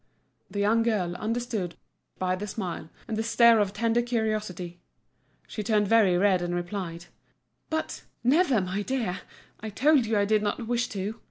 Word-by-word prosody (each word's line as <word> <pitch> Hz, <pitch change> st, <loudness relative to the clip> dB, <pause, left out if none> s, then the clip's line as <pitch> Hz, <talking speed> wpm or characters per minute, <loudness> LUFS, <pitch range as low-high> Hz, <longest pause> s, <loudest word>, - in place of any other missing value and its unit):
The 200 Hz, -, -7 dB
young 220 Hz, +3 st, +3 dB
girl 205 Hz, -7 st, 0 dB
understood 220 Hz, -4 st, -3 dB, 0.4 s
by 185 Hz, 0 st, 0 dB
the 205 Hz, +3 st, -5 dB
smile 185 Hz, -6 st, -5 dB, 0.2 s
and 225 Hz, -, -2 dB
the 220 Hz, -, 0 dB
stare 230 Hz, 0 st, +5 dB
of 205 Hz, -2 st, +1 dB
tender 230 Hz, +3 st, +1 dB
curiosity; 215 Hz, -7 st, -2 dB, 0.7 s
she 215 Hz, -, -5 dB
turned 210 Hz, -1 st, +2 dB
very 200 Hz, -5 st, +4 dB
red 190 Hz, -1 st, +3 dB
and 175 Hz, 0 st, -2 dB
replied: 175 Hz, -1 st, -4 dB, 0.6 s
"But—never, 300 Hz, -, +1 dB
my 185 Hz, +2 st, -2 dB
dear! 215 Hz, -6 st, -2 dB, 0.4 s
I 220 Hz, -, -5 dB
told 265 Hz, +3 st, +3 dB
you 220 Hz, -1 st, +1 dB
I 200 Hz, -, +3 dB
did 215 Hz, +1 st, +2 dB
not 210 Hz, +3 st, -2 dB
wish 240 Hz, +1 st, 0 dB
to! 205 Hz, +3 st, -4 dB
210 Hz, 160 wpm, -27 LUFS, 185-230 Hz, 0.7 s, stare